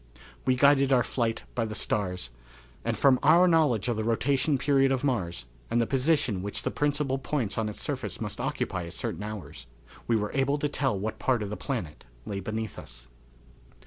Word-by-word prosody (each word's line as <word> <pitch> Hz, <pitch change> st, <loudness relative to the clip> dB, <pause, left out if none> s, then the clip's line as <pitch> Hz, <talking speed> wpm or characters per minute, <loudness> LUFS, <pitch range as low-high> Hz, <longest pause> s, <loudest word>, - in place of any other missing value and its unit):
We 130 Hz, -, +3 dB
guided 140 Hz, 0 st, +5 dB
our 125 Hz, -2 st, +5 dB
flight 115 Hz, -2 st, -1 dB
by 115 Hz, -, 0 dB
the 110 Hz, -1 st, -5 dB
stars, 90 Hz, -, -1 dB, 0.5 s
and -, -, -1 dB
from 130 Hz, -2 st, +5 dB
our 180 Hz, +2 st, +6 dB
knowledge 150 Hz, -, +3 dB
of 120 Hz, -3 st, 0 dB
the 110 Hz, -, -1 dB
rotation 135 Hz, +5 st, +1 dB
period 135 Hz, 0 st, +3 dB
of 130 Hz, 0 st, 0 dB
Mars, 90 Hz, -, -1 dB, 0.2 s
and 120 Hz, -, +2 dB
the 115 Hz, -, +3 dB
position 130 Hz, -, +1 dB
which 100 Hz, +1 st, -4 dB
the -, -, -1 dB
principal 145 Hz, -2 st, 0 dB
points 130 Hz, -7 st, -2 dB
on 110 Hz, -1 st, -1 dB
its 105 Hz, -, -6 dB
surface -, -, -3 dB
must -, -, -4 dB
occupy 90 Hz, -2 st, -2 dB
at 85 Hz, -, -9 dB
certain -, -, -3 dB
hours, 85 Hz, -, -7 dB, 0.4 s
we 115 Hz, -, +3 dB
were 105 Hz, -1 st, -1 dB
able 140 Hz, +1 st, +2 dB
to 145 Hz, -, 0 dB
tell 135 Hz, -6 st, 0 dB
what 110 Hz, +3 st, -4 dB
part 125 Hz, -4 st, +1 dB
of 100 Hz, -, -5 dB
the -, -, -2 dB
planet 105 Hz, -, -5 dB, 0.2 s
lay 100 Hz, -2 st, -3 dB
beneath 110 Hz, +3 st, -4 dB
us. -, -, -11 dB
115 Hz, 195 wpm, -28 LUFS, 105-135 Hz, 0.5 s, our